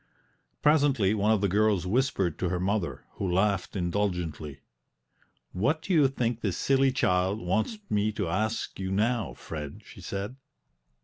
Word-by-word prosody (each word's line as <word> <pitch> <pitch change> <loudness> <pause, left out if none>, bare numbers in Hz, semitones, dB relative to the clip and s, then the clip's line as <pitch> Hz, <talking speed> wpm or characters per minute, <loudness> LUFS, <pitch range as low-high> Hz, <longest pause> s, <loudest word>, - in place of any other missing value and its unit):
Presently 140 -9 +4
one 105 0 +2
of 110 -3 +2
the 100 - +3
girls 100 -1 +2
whispered 100 - 0
to 90 - 0
her 90 0 -1
mother, 95 0 -1
who 95 -3 -1
laughed 95 +1 +1
indulgently. 85 -6 -2 0.9
"What 140 - 0
do 195 - -1
you 150 -5 +6
think 120 -3 -2
this 95 -4 -1
silly 135 0 +3
child 95 -4 +1
wants 110 - -1
me 105 +1 +1
to 100 -4 -2
ask 110 +7 -2
you 95 -1 -3
now, 105 - 0
Fred?" 75 -3 -7
she - - -13
said. 100 +6 -5
100 Hz, 150 wpm, -28 LUFS, 90-115 Hz, 0.9 s, you